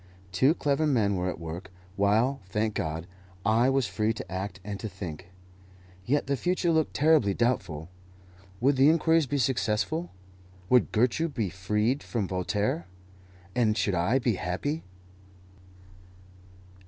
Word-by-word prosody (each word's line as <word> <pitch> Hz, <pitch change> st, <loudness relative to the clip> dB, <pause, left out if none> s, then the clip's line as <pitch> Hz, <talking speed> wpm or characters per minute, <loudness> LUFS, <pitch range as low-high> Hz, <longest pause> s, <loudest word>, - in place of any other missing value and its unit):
Two 130 Hz, -, +3 dB
clever 150 Hz, 0 st, +1 dB
men 110 Hz, -8 st, +2 dB
were 90 Hz, 0 st, -1 dB
at -, -, -4 dB
work, 85 Hz, +3 st, -7 dB, 0.3 s
while, 110 Hz, +7 st, +2 dB
thank 105 Hz, +3 st, -1 dB
God, 80 Hz, -1 st, -3 dB, 0.4 s
I 115 Hz, +4 st, +4 dB
was 135 Hz, -1 st, +2 dB
free 105 Hz, +3 st, 0 dB
to 110 Hz, -, -8 dB
act 95 Hz, 0 st, -4 dB
and 100 Hz, 0 st, -5 dB
to 110 Hz, -, -4 dB
think. 85 Hz, -4 st, -8 dB, 0.8 s
Yet 145 Hz, +4 st, +2 dB
the 140 Hz, +1 st, 0 dB
future 175 Hz, +4 st, 0 dB
looked 160 Hz, -1 st, +1 dB
terribly 145 Hz, -10 st, +4 dB
doubtful. 95 Hz, -10 st, -1 dB, 0.7 s
Would 135 Hz, +2 st, +3 dB
the 135 Hz, +3 st, +6 dB
inquiries 160 Hz, -1 st, +3 dB
be 145 Hz, -, -1 dB
successful? 130 Hz, +5 st, 0 dB, 0.6 s
would 125 Hz, -1 st, +4 dB
Gertrude 130 Hz, +7 st, +1 dB
be 105 Hz, -7 st, -1 dB
freed 105 Hz, +8 st, 0 dB
from 110 Hz, -5 st, -2 dB
Voltaire? 95 Hz, -1 st, -1 dB, 0.7 s
and 110 Hz, -2 st, +2 dB
should 100 Hz, 0 st, +1 dB
I 90 Hz, +9 st, +2 dB
be 120 Hz, -6 st, 0 dB
happy? 120 Hz, -, -2 dB
110 Hz, 140 wpm, -28 LUFS, 95-140 Hz, 0.8 s, the